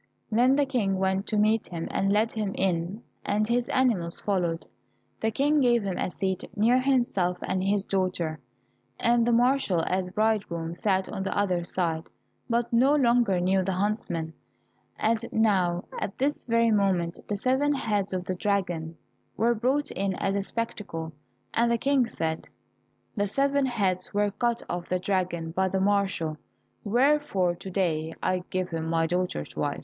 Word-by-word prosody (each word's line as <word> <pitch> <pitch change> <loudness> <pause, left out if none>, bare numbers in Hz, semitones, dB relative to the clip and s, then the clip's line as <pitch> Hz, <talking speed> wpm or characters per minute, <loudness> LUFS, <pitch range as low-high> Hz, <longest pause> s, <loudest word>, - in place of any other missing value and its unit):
Then 245 +4 +4
the 285 0 +3
King 220 -8 0
went 190 +1 0
to 215 - 0
meet 215 +1 +2
him 165 -2 -5
and 195 0 +1
led 215 +2 +2
him 210 -3 -2
in, 185 +3 -1 0.2
and 210 +1 0
his 240 +1 0
animals 215 -10 +1
followed. 175 -5 -1 0.5
The 220 - +1
King 290 +6 +2
gave 240 -3 +3
him 195 -2 -3
a - - 0
seat 190 0 -2
near 235 +5 +4
himself 240 -9 +1
and 185 0 -1
his 200 0 +1
daughter, 180 -5 -1 0.6
and 235 0 +3
the - - +3
marshal, 240 -7 +3
as 185 0 -1
bridegroom, 195 -5 -1
sat 190 0 0
on - - -5
the 195 - -2
other 185 -4 +1
side, 170 -2 -1 0.4
but 235 0 0
no 265 +5 +5
longer 235 -8 +3
knew 190 +2 +2
the 190 +1 -1
huntsman. 180 -5 -2 0.6
And 225 +1 +1
now 185 -6 +2 0.2
at 200 - -4
this 285 +3 -1
very 230 -1 +3
moment, 190 -5 +1
the 205 - -1
seven 260 +7 +1
heads 205 -6 -1
of 185 -1 -3
the 185 - -2
dragon 175 -4 -1 0.4
were 230 +3 +3
brought 265 +6 0
in 195 -1 -1
as 195 - -1
a 200 - 0
spectacle, 195 -7 -4 0.4
and 235 +1 +2
the 235 - +3
King 270 -1 +2
said, 160 0 -3 0.7
"The 205 -2 0
seven 275 +5 +1
heads 195 -6 -1
were 205 0 +2
cut 235 +3 -1
off 175 0 -4
the 185 - +1
dragon 180 -3 -1
by 190 +3 +1
the 190 - 0
marshal, 195 -6 +1 0.5
wherefore 240 -5 +2
to 180 +2 -9
day 165 -4 -1
I 185 -1 +1
give 185 0 -2
him 160 -1 -3
my 165 0 +2
daughter 180 - -1
to - - -10
wife." - - -1
200 Hz, 170 wpm, -27 LUFS, 180-230 Hz, 0.7 s, no